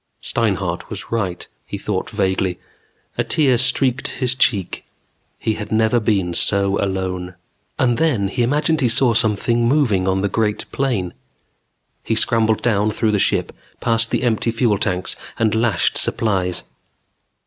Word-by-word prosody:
_ - - -10
Steinhart - - -1
was - - -8
right, 100 -6 -2 0.2
he - - -6
thought - - -3
vaguely. 95 -1 -1 0.6
A - - +3
tear 135 -6 +2
streaked 130 +1 +1
his 125 -2 0
cheek. 105 -8 0 0.5
He 110 - -1
had 105 0 -7
never 110 +2 +3
been 100 -6 0
so 100 +2 +1
alone. 90 -2 -3 0.4
And 120 -2 +1
then 125 -12 +1
he 120 - -2
imagined 150 +5 +1
he 125 - +3
saw 120 +1 +3
something 115 +1 +1
moving 120 -9 +2
on 95 0 +1
the 100 - +1
great 105 0 -1
plain. 115 -10 -1 0.9
He 110 - -1
scrambled 110 -1 +2
down 105 -3 +2
through 110 +1 0
the 105 - +1
ship, - - +1 0.3
past 115 0 +2
the - - -1
empty 115 -1 +1
fuel 115 -3 +1
tanks 90 -3 -1 0.2
and 110 -2 +1
the 110 - +1
lashed 110 -6 +1
supplies. 95 -5 -1
110 Hz, 155 wpm, -20 LUFS, 100-120 Hz, 0.9 s, A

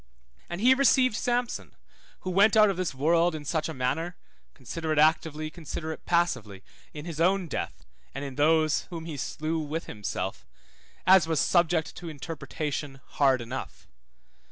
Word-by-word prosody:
And 175 +3 -4
he 255 +3 +7
received 260 -3 +4
Samson, 245 0 -2 0.5
who 185 - -3
went 205 +4 +5
out 215 -2 +7
of 190 - -5
this 180 -6 -2
world 165 +4 +3
in 150 -1 -7
such 160 +2 -1
a - - -4
manner 155 +8 -1 0.4
(consider 155 +5 -5
it 155 - 0
actively, 155 0 +2
consider 160 0 -6
it 160 - -9
passively 115 - 0 0.3
in 150 0 -8
his 165 -2 -4
own 185 +1 +2
death, - - -5 0.3
and 135 +1 -4
in 135 - -6
those 155 +2 +2
whom 165 -2 -6
he 160 -3 -5
slew 155 +4 -3
with 155 +2 -4
himself) 95 -2 -5 0.6
as 185 -3 +6
was 160 -3 +1
subject 170 -2 +2
to 170 -1 -7
interpretation 145 -2 -5
hard 135 -3 +3
enough. 125 +3 -7
160 Hz, 160 wpm, -27 LUFS, 145-175 Hz, 0.6 s, he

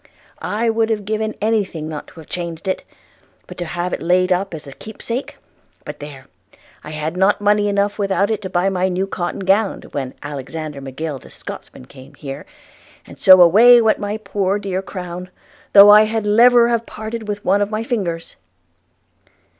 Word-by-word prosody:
– - - -31 0.2
I 235 - +1
would 225 0 +1
have 210 -3 -2
given 215 +1 -2
any 220 0 +2
thing 160 -5 -7
not 155 -2 -7
to 165 - -15
have 155 - -16
changed 170 0 -6
it, 190 - -2 0.6
but - - -11
to 175 - -3
have 175 +2 -4
laid 180 +2 +2
it - - +7
up 190 +2 -2
as 155 - -9
a 140 - -10
keepsake 230 - -6 0.2
– - - -38
But - - -8
there! 145 -2 -10 0.3
– - - -29
I - - -9
had 155 +2 -4
not 190 +2 +2
money 205 0 +2
enough 200 +1 0
without 200 +1 +1
it 215 -1 -2
to 190 - -6
buy 180 +1 0
my 185 0 0
new 185 +1 -1
cotton 175 -1 -4
gown, 195 +2 +1
when 135 -3 -5
Alexander 145 +1 -6
Macgill 135 +2 -5
the - - -16
Scotchman - - -10
called 135 +1 -15
here; 140 - -8 0.6
and - - -14
so 185 -2 +8
away 230 +8 +7
went 220 -2 +2
my 205 +1 -3
poor 200 -2 -1
dear 195 -2 -3
crown, 180 -1 -7 0.4
though 205 0 +9
I 210 +1 +8
had 220 0 -2
leverer 235 +3 +5
have 235 -1 -1
parted 220 0 -7
with 205 0 -5
one 200 +2 +2
of 205 - 0
my 215 +1 -3
fingers.' 185 -9 -3
195 Hz, 195 wpm, -19 LUFS, 165-215 Hz, 0.6 s, though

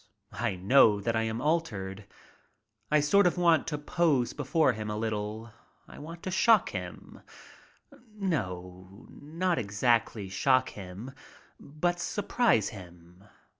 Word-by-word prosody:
I 115 -4 -1
know 105 +2 +4
that 115 +3 -1
I 110 - +1
am 110 +1 -3
altered. 105 - -2 0.8
I 150 0 +4
sort 180 +7 +4
of 180 - -1
want 170 -4 +3
to 150 - -2
pose 145 -4 +1
before 145 -1 +1
him 110 -1 -5
a 105 - -3
little. 110 +1 -4 0.4
I - - -13
want 165 +3 -10
to 185 - -4
shock 215 +2 +4
him; 90 -2 -8 1.0
no, 95 - -4
not 165 +4 -2
exactly 110 -1 0
shock 130 +6 +2
him, 100 +6 -9 0.5
but 175 +5 -2
surprise 205 - +1
him. 90 -1 -14
120 Hz, 130 wpm, -29 LUFS, 100-165 Hz, 1.0 s, know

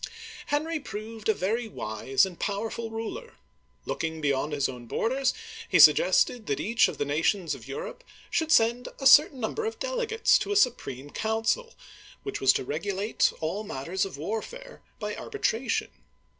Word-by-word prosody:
Henry 310 +2 -1
proved 220 -4 -6
a - - +5
very 225 +6 -1
wise 130 - 0
and 185 -3 -9
powerful 225 +3 -3
ruler. 225 - -6 0.5
Look - - -3
ing 160 0 -3
beyond 145 0 0
his 145 -2 +1
own 125 -2 -9
borders, 260 - 0 0.4
he - - +4
suggested 245 - +5
that 140 - -1
each 225 +2 +3
of - - -6
the 145 - -1
nations 165 +4 0
of - - -10
Europe - - -6 0.3
should 320 -1 0
send 235 0 +3
a 270 - -5
certain 285 -1 +7
number 250 - -2
of 445 - -3
dele - - -2
gates 450 0 +3
to - - -3
a - - +1
supreme 145 - 0
council, 225 - -1 0.5
which 405 - -5
was 130 - +6
to - - -1
regulate 195 - 0
all 175 +7 -2
matters 180 +1 -3
of 195 -7 -5
warfare 225 - -6 0.2
by - - -4
arbitration. 250 - -2
225 Hz, 165 wpm, -27 LUFS, -, 0.5 s, certain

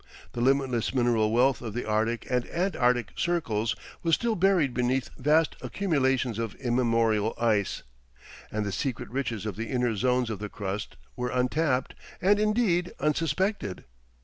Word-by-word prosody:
The 120 - -4
limitless 130 -2 +1
mineral 120 -4 +2
wealth 125 +3 +3
of 110 -3 -6
the 120 - -2
Arctic 110 +2 0
and 125 -1 0
Antarctic 125 - +1
circles 115 -11 0 0.3
was 165 -2 +3
still 235 -1 0
buried 180 -8 +3
beneath 125 +2 0
vast 150 +4 +2
accumulations 130 - 0
of 115 -3 -3
immemorial 115 -3 +1
ice, 110 -4 +1 0.7
and 105 0 -2
the 100 - -2
secret 125 +2 -3
riches 120 -6 -2
of 105 -4 -4
the 115 0 -4
inner 125 -3 0
zones 125 +2 +1
of 105 - -4
the 105 0 -5
crust 100 0 -5 0.2
were 125 0 -2
untapped 130 +2 0 0.3
and 205 +2 +3
indeed 210 -5 +1
unsuspected. 150 - -1
125 Hz, 150 wpm, -27 LUFS, 115-150 Hz, 0.7 s, wealth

